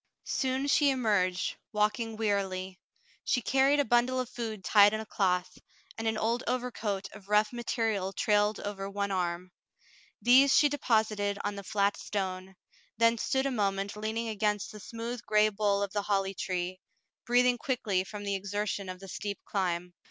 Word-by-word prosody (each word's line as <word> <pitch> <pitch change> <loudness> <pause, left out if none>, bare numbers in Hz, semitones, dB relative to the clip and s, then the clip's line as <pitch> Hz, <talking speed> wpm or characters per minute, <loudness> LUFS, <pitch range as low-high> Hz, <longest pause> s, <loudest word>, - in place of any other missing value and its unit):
Soon 265 0 -1
she 285 0 +4
emerged, 205 -8 +1 0.2
walking 215 +2 0
wearily. 190 -3 -1 0.4
She 250 - 0
carried 270 +2 +3
a 285 - +3
bundle 240 +2 +2
of 255 -1 -3
food 220 -5 -5
tied 205 +1 +6
in - - -3
a 220 - -6
cloth, 180 -3 -1 0.4
and 225 0 -3
an 220 -1 0
old 230 +3 0
overcoat 220 -6 -2
of 205 -2 -13
rough 210 +2 +3
material 225 -5 -1
trailed 210 +1 +1
over 195 -1 -5
one 200 0 -2
arm. 180 -1 -2 0.7
These 265 +3 +6
she 295 - +5
deposited 215 -7 +1
on 205 - -1
the 200 0 -7
flat 200 +1 +1
stone, 190 -1 -4 0.4
then 230 0 +3
stood 265 +4 0
a 275 - 0
moment 200 -3 -1
leaning 220 +2 -3
against 210 -1 -1
the 210 - -10
smooth 230 +3 -6
gray 215 -2 +3
bole 200 -1 +1
of 200 - -4
the 205 - 0
holly 195 -1 0
tree, 185 -1 -3 0.5
breathing 245 0 +4
quickly 225 -9 0
from 205 +2 -8
the 200 -1 -1
exertion 200 0 -3
of 185 0 -7
the 195 - -9
steep 200 +1 -4
climb. 180 -2 -2
210 Hz, 165 wpm, -30 LUFS, 195-230 Hz, 0.7 s, tied